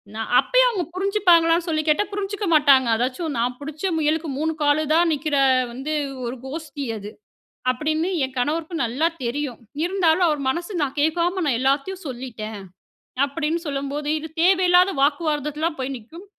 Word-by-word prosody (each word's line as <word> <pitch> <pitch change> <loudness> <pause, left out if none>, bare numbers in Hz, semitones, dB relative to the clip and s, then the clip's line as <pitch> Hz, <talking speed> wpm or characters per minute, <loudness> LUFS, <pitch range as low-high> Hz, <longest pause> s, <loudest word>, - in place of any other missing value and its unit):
நான் 225 0 -4
அப்பயும் - - +4
அவுங்க 390 -7 -2
புரிஞ்சிப்பாங்களான்னு 355 -4 +3
சொல்லி 310 -2 0
கேட்டா, 305 +6 +3
புரிஞ்சுக்க 410 +1 -3
மாட்டாங்க. 280 -4 +5
அதாச்சும் 260 +6 -2
நா 230 - +1 0.2
புடிச்ச 305 +6 -4
முயலுக்கு 315 +1 0
3 320 +2 0
காலுதான்னு 310 +3 +3
நிக்கிற 295 0 -2 0.4
வந்து 270 +6 -4 0.3
ஒரு 240 +2 -4
கோஷ்டி 300 +1 -6
அது. 205 0 -8 0.6
அப்டின்னு 310 +6 -1
என் 260 0 -6
கணவருக்கும் 320 +5 -1
நல்லா 255 +8 0 0.2
தெரியும். 255 0 -3 0.3
இருந்தாலும் 355 -1 +2
அவரு 300 -2 0
"மனசு 345 +7 -4
நா 290 - +1
கேக்காம 345 +4 +1
நா 285 - +2
எல்லாத்தையும் 280 +8 0
சொல்லிட்டேன்" 235 -5 -6 0.7
அப்டின்னு 315 +3 -2
சொல்லும்போது, 280 +1 -3
இது 320 +1 -8
தேவையில்லாத 365 +1 +5
வாக்குவாதத்துல 300 +1 0
தான் 315 -4 -6
போய் 265 +1 -3
நிக்கும். 325 - -13
310 Hz, 145 wpm, -22 LUFS, 275-345 Hz, 0.7 s, மாட்டாங்க